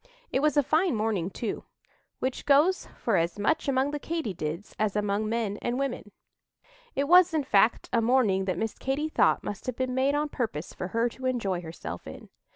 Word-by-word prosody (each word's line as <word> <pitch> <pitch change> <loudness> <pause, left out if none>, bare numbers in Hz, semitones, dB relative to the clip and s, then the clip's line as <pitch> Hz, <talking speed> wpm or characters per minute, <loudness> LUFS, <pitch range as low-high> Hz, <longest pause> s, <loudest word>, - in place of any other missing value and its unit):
It - - +1
was 300 0 +2
a 290 - +5
fine 315 +2 +2
morning, 210 -5 0
too, 215 +2 -4 0.5
which 260 0 -3
goes 300 +7 +4
for 225 -5 +1
as 170 +2 0
much 290 +10 0
among 270 +1 +1
the 295 - -3
Katy 320 - -3
dids 165 +4 -5
as 215 -2 0
among 210 +1 0
men 220 -3 -1
and 240 +1 -1
women. 265 -6 -3 0.8
It 280 - 0
was, 355 0 +6
in 305 - +1
fact, 220 -2 +3
a 235 - +3
morning 225 -6 +3
that 185 -3 -1
Miss 220 +3 -2
Katy 280 +4 -2
thought - - +3
must 205 +2 -6
have 255 - -2
been 255 0 -2
made 265 +2 +2
on 295 +1 0
purpose 215 - -3
for 180 - -5
her 230 +4 +1
to 260 +2 -5
enjoy 200 -8 -1
herself 90 - -7
in. 80 - -10
235 Hz, 200 wpm, -27 LUFS, 200-275 Hz, 0.8 s, was